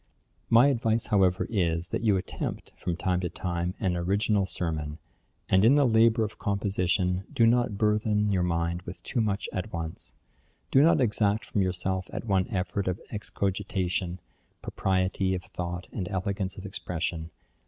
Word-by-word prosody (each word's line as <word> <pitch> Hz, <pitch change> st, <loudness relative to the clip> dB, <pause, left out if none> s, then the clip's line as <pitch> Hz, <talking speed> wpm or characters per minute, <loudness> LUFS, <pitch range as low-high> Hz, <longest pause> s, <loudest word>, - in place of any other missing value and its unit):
'My 120 Hz, +4 st, +7 dB
advice, 115 Hz, -3 st, +1 dB
however, 95 Hz, -1 st, +3 dB
is, 85 Hz, -5 st, 0 dB
that -, -, -2 dB
you 105 Hz, -4 st, +3 dB
attempt, 95 Hz, -, -5 dB
from 90 Hz, -2 st, -3 dB
time 90 Hz, 0 st, 0 dB
to 90 Hz, -1 st, -2 dB
time, 90 Hz, +1 st, -3 dB
an 95 Hz, -4 st, 0 dB
original 100 Hz, +3 st, +1 dB
sermon; 80 Hz, -4 st, -3 dB, 0.5 s
and 95 Hz, +1 st, +4 dB
in 120 Hz, +6 st, +6 dB
the 145 Hz, -1 st, +5 dB
labour 115 Hz, -1 st, +4 dB
of 110 Hz, +1 st, -5 dB
composition, 95 Hz, -2 st, 0 dB
do 115 Hz, -, +3 dB
not 120 Hz, -2 st, +2 dB
burthen 105 Hz, 0 st, +2 dB
your 95 Hz, -2 st, +2 dB
mind 85 Hz, 0 st, 0 dB
with 90 Hz, +1 st, -9 dB
too 120 Hz, -, -1 dB
much 100 Hz, -2 st, -1 dB
at 95 Hz, +4 st, -3 dB
once; 85 Hz, -1 st, -5 dB, 0.6 s
do 135 Hz, -, +6 dB
not 165 Hz, +3 st, +5 dB
exact 105 Hz, -2 st, +1 dB
from 100 Hz, -, -1 dB
yourself 95 Hz, 0 st, -1 dB
at -, -, -5 dB
one 95 Hz, -4 st, +2 dB
effort 95 Hz, +1 st, -2 dB
of 90 Hz, -1 st, -1 dB
excogitation, 95 Hz, -3 st, -2 dB, 0.4 s
propriety 95 Hz, 0 st, 0 dB
of 90 Hz, -, -5 dB
thought 90 Hz, 0 st, -5 dB
and 95 Hz, -4 st, -4 dB
elegance 95 Hz, -1 st, -2 dB
of 95 Hz, -, -8 dB
expression. 85 Hz, -3 st, -3 dB
95 Hz, 160 wpm, -28 LUFS, 90-105 Hz, 0.6 s, My